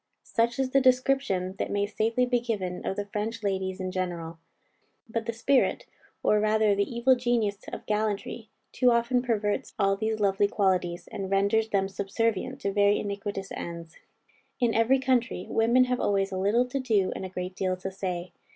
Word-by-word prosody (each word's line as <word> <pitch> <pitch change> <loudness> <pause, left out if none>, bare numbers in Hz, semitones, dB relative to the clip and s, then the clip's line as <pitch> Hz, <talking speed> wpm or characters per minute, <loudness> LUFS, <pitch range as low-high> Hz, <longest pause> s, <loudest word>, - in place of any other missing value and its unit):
Such 235 +1 0
is 265 -1 0
the 275 - +4
description 255 -8 +2
that - - -1
may 205 0 0
safely 225 +4 0
be 245 -1 +1
given 200 -7 -3
of - - -1
the 205 - -3
French 215 +2 -4
ladies 190 -1 -1
in 185 0 -3
general. 170 -3 -4 0.7
But 225 0 -3
the - - +1
spirit, 255 +4 +1 0.4
or 210 - +4
rather 215 0 +3
the 200 +3 0
evil 240 +2 +4
genius 235 -5 0
of - - -7
gallantry, 215 +1 -2 0.2
too 250 - +3
often 235 +1 +2
perverts 215 -4 -1
all 195 -1 +2
these 220 +2 -2
lovely 200 0 +3
qualities, 185 -4 0
and 190 -1 -5
renders 200 +3 +2
them 195 -2 +1
subservient 225 +6 -2
to 200 - -1
very 205 0 +4
iniquitous 200 -1 -4
ends. 170 -1 -7 0.6
In 240 -2 +2
every 230 +4 +4
country, 255 -6 0
women 235 +3 +4
have 250 0 -1
always 195 -1 +1
a - - -3
little 215 +6 +3
to 275 - -2
do, 215 -7 +1
and - - -5
a 190 - -5
great 180 0 -5
deal 185 -1 -1
to 190 +1 -5
say. 180 -2 -4
210 Hz, 180 wpm, -27 LUFS, 195-235 Hz, 0.7 s, the